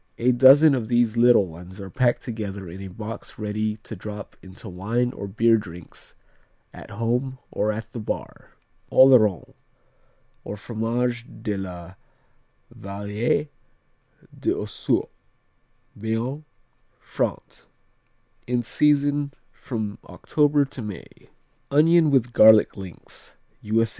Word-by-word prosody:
A 125 +2 +3
dozen 135 +5 +7
of 120 -5 -1
these 120 -1 +2
little 120 -3 +5
ones 90 +3 -11
are 95 -1 -8
packed 125 +1 +1
together 100 -5 -6
in 90 +3 -9
a 100 - -6
box 105 +4 -8
ready 105 0 -2
to 110 - -8
drop 105 +1 -8
into 95 +4 -12
wine 115 +7 -1
or 100 - -6
beer 115 +3 +3
drinks 90 -5 -11 0.6
at - - -11
home 120 +5 -2
or 105 +1 0
at 110 +1 -6
the 120 - -6
bar. 105 - -6 0.4
Oloron, 115 -8 +5 0.9
or 105 - -6
Fromage 120 +2 -2 0.2
de 105 -2 -1
la 90 -2 -7 0.8
Vallee 105 +8 -2 0.9
d'ossour - - -1 0.9
Béarn, 115 +7 -3 0.5
France - - -4 0.8
In 120 0 0
season 145 +2 +1 0.2
from 110 -5 -5
October 145 -1 +1
to 135 -1 -9
May. 105 -5 -10 0.4
Onion 160 +3 +5
with 125 -3 +1
garlic 110 -2 +6
links 95 -4 -11 0.3
_U.S. 115 +2 +1
115 Hz, 115 wpm, -24 LUFS, 100-125 Hz, 0.9 s, dozen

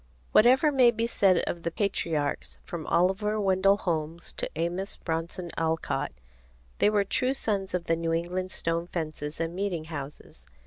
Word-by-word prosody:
Whatever 260 +7 +6
may 255 -4 +6
be 230 -1 0
said 195 -6 +3
of 170 - -3
the 170 - -1
patriarchs, 165 -6 -2
from 165 -3 -6
Oliver 195 +5 +2
Wendell 195 0 +3
Holmes 165 -3 -3
to - - -3
Amos 175 +5 -2
Bronson 170 +1 -4
Alcott, 160 -4 -1 0.7
they - - +5
were 210 -1 +3
true 255 +7 0
sons 195 -7 -1
of 180 - -1
the 165 -1 +1
New 165 0 -2
England 180 +3 -2
stone 165 +1 -1
fences 155 -3 -4
and 165 0 -2
meeting 185 -3 -2
houses. 150 -3 -8
175 Hz, 160 wpm, -28 LUFS, 165-200 Hz, 0.7 s, Whatever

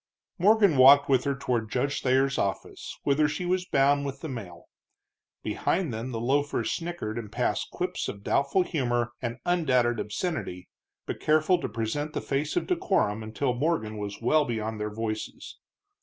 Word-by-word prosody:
Morgan 200 -4 +5
walked 140 +2 +8
with 130 -1 +3
her 140 -1 0
toward 120 -5 -2
Judge 140 +4 -1
Thayer's 135 +1 +2
office, 100 -1 -3
whither 145 +2 +3
she 165 +4 -3
was 180 0 0
bound 140 +1 +3
with 140 -1 -5
the - - -4
mail. 90 -10 -8 0.8
Behind 170 -8 -1
them 115 +3 -4
the 115 -3 -4
loafers 140 +5 0
snickered 170 -11 -4
and 105 -3 -8
passed - - -1
quips - - -3
of 100 - -7
doubtful 140 - +2
humor 120 -8 -1
and 120 -1 -3
undoubted 125 -10 +2
obscenity, 105 - -4 0.4
but - - -5
careful 155 +4 +3
to - - -3
present 115 +8 -3
the - - -1
face 145 +2 -2
of - - 0
decorum 190 - 0
until 110 +4 -1
Morgan 125 -5 -1
was 105 -1 -5
well 150 +6 +3
beyond 110 -4 -3
their 105 0 -2
voices. 110 0 -5
135 Hz, 165 wpm, -27 LUFS, 115-155 Hz, 0.8 s, walked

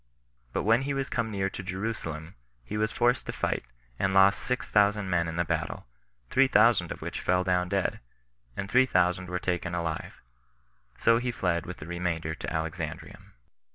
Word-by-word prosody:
But - - -1
when 115 +4 +4
he 140 +1 -2
was 135 0 -2
come 115 -2 0
near 100 -2 -1
to - - -6
Jerusalem, 90 -4 -4 0.3
he 105 - -6
was 110 0 +1
forced 120 +1 +1
to - - -1
fight, - - -1 0.4
and 95 0 +1
lost 95 +1 +6
six 125 0 -2
thousand 105 -2 +2
men 85 -1 +2
in 80 - -4
the 85 0 +1
battle; - - -2 0.5
three 135 0 +5
thousand 105 -7 +4
of - - -6
which - - -4
fell 90 0 +2
down 90 -1 +1
dead, 100 0 0 0.6
and 100 - -3
three 130 +5 +4
thousand 90 -3 +1
were 90 - -1
taken 90 -1 -2
alive; 85 -2 -4 0.8
so 115 0 +4
he 125 +1 -2
fled 90 -7 -1
with 90 - -6
the - - -9
remainder 85 -2 -2
to - - -7
Alexandrium. 80 -1 -5
95 Hz, 185 wpm, -28 LUFS, 85-110 Hz, 0.8 s, lost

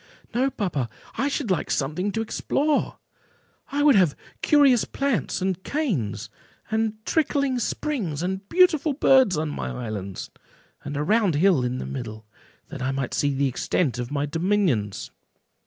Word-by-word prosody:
"No, 260 +3 +2
papa; 165 - -2 0.3
I 270 +5 0
should 280 -6 -1
like 185 - 0
something 155 +8 -1
to 225 - -1
explore; 290 +6 0 0.7
I 290 +1 +1
would 295 -1 +7
have 180 - +4 0.3
curious 280 -6 +5
plants, 245 - -1
and 190 -1 -1
canes, 200 - -2 0.4
and 220 0 +1
trickling 280 -5 +1
springs, 210 - -2
and 190 +2 -3
beautiful 320 -5 +4
birds, 260 - +4
on 155 0 -1
my 145 - -4
islands, 105 -6 -5 0.5
and 145 -1 -5
a 145 - 0
round 205 -2 +2
hill 165 -4 +4
in 125 +1 -1
the - - -5
middle, 110 -4 -6 0.4
that - - -7
I 130 - 0
might 135 -2 -2
see 145 - +1
the 140 +1 +2
extent 130 +1 -1
of 120 0 -3
my 145 0 -1
dominions." 165 - 0
185 Hz, 155 wpm, -24 LUFS, -, 0.7 s, would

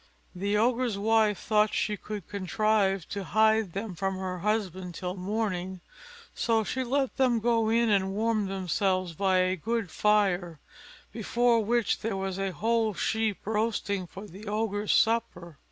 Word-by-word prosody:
The 200 +3 -1
Ogre's 235 -1 +1
wife 215 -1 +2
thought 215 +1 +1
she 210 - 0
could 205 -3 -7
contrive 200 -1 0
to 200 -1 -4
hide 220 0 +2
them 200 0 -4
from 190 +2 -2
her 185 -1 -4
husband 190 -3 -2
till 180 +1 -4
morning; 190 -2 -3 0.5
so 225 -2 +1
she 260 +5 -2
let 265 +1 -1
them 250 -3 +3
go 230 -1 +2
in 230 0 +3
and 195 -1 +2
warm 215 -1 +1
themselves 185 -1 -1
by 190 +2 +1
a 185 0 +2
good 225 +1 -2
fire, 190 -6 +1 0.5
before 235 +1 +1
which 235 +1 +1
there 220 -3 -2
was 190 0 -3
a 195 -1 -1
whole 220 +4 0
sheep 220 0 -1
roasting 210 -3 -1
for 195 +4 -10
the 205 +2 -11
Ogre's 210 -1 -1
supper. 180 -9 +1
210 Hz, 155 wpm, -28 LUFS, 190-225 Hz, 0.5 s, them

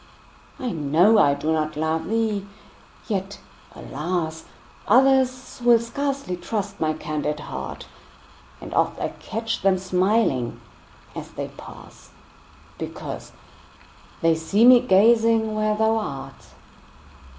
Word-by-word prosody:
I 255 -4 -3
know 170 +7 +3
I 140 -6 +4
do 155 +3 -1
not 155 -1 -2
love 160 +1 -1
thee! 220 -3 -1 0.6
yet, 195 -2 -3 0.4
alas! 160 +2 -4 0.4
Others 255 +1 +3
will 240 -1 +6
scarcely 270 -2 -3
trust 200 +2 -4
my 155 -1 +1
candid 150 -1 -3
heart; - - -7 0.7
And - - -9
oft - - +1
I - - -1
catch 225 +1 -4
them 195 -1 +3
smiling 185 - 0 0.6
as - - -7
they - - -6
pass, - - -13 0.7
Because - - -7 0.9
they 165 0 +4
see 180 +8 +2
me 250 0 +9
gazing 225 0 +3
where 215 0 0
thou 220 +1 +2
art. 135 -10 -6
200 Hz, 115 wpm, -23 LUFS, 160-225 Hz, 0.9 s, me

